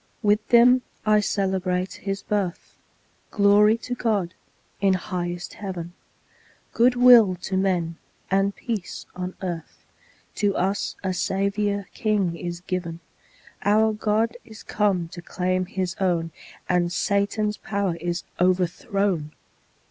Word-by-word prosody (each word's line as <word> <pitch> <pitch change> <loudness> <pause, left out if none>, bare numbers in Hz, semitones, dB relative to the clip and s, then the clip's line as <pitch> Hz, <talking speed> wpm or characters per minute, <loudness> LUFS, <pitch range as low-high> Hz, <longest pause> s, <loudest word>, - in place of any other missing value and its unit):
With 210 +1 +2
them 245 +2 +6 0.2
I 215 0 +5
celebrate 190 -2 -1
His 195 0 -3
birth 200 -5 -3 0.5
Glory 210 +2 +5
to 250 - -3
God, 210 -8 -1 0.5
in 195 -1 +3
highest 175 -1 -4
Heaven, 175 -4 -6 0.8
Good 245 +2 +4
will 240 -6 +7
to 190 - -2
men, 180 -4 0 0.3
and 195 +1 +2
peace 220 -6 -5
on 180 0 -5
earth, 170 -3 -6 0.5
To 205 -2 +1
us 195 +2 -1
a 190 -1 -1
Saviour 200 +2 -1
king 205 -7 0
is 175 0 -5
given; 175 -2 -4 0.6
Our 215 +2 +3
God 220 +2 0
is 220 -1 -13
come 195 -5 0
to 175 - -9
claim 185 +1 -1
His 185 -2 -3
own, 170 -3 0 0.4
And 175 -1 +1
Satan's 205 +2 0
power 200 -4 -2
is 170 +1 -3 0.2
overthrown! 180 -2 0
195 Hz, 120 wpm, -24 LUFS, 180-210 Hz, 0.8 s, will